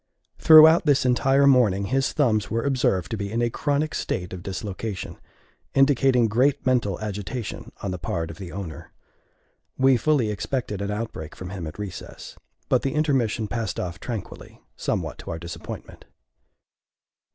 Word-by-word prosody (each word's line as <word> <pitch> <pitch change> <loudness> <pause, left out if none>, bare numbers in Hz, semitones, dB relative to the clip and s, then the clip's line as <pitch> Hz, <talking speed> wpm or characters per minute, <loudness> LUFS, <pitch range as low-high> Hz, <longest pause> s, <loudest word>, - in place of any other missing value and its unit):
Throughout 160 +1 +8
this 140 -3 +3
entire 135 +2 +3
morning 115 -8 +4
his 135 +5 0
thumbs 110 -8 +1
were 115 +1 -1
observed 125 -10 0
to 110 - -2
be 100 0 -4
in 115 - -1
a 120 - 0
chronic 145 +4 -1
state 90 0 -3
of 90 - -6
dislocation, 100 +1 -5 0.6
indicating 135 -3 +4
great 130 +6 +1
mental 120 -8 +1
agitation 105 +3 -5
on 100 - -2
the 90 - -5
part 80 -1 -3
of 80 - -12
the 90 -3 -7
owner. 85 -3 -8 0.8
We 130 -1 +4
fully 130 -5 +1
expected 105 0 -3
an 100 - -2
outbreak 105 -7 -5
from 90 0 -8
him 90 -5 -5
at 75 - -9
recess; 100 -4 -8 0.3
but - - +2
the 135 +1 -2
intermission 130 -8 +1
passed 115 -2 -3
off 90 0 -4
tranquilly, 115 -6 -7
somewhat - - -3
to - - -9
our 80 - -3
disappointment. 85 +1 -9
110 Hz, 155 wpm, -24 LUFS, 95-135 Hz, 0.8 s, Throughout